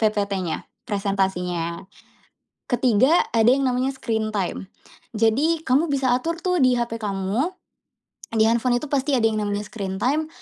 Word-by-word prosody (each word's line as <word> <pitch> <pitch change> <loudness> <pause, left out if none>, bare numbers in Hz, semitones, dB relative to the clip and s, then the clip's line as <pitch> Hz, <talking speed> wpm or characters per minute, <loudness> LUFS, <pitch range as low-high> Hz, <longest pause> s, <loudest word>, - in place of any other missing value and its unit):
PPT-nya, 200 -5 -1 0.2
presentasinya. 190 -4 -1 0.9
Ke-3, 250 +5 +3
ada 225 0 +4
yang 270 +2 +4
namanya 255 +2 0
screen 220 -4 -2
time. 190 -1 -2 0.5
Jadi 275 +10 +2
kamu 270 +6 +3
bisa 265 -3 +1
atur 330 +6 -2
tuh 360 -1 +1
di 255 -1 +4
HP 235 -1 -2
kamu, 200 - -1 0.9
di 220 - +5
handphone 240 +1 +2
itu 300 - -7
pasti 280 0 +1
ada 230 - 0
yang 215 -1 -2
namanya 205 0 -2
screen 195 -3 -5
time, 305 +5 +1
230 Hz, 145 wpm, -23 LUFS, 205-265 Hz, 0.9 s, di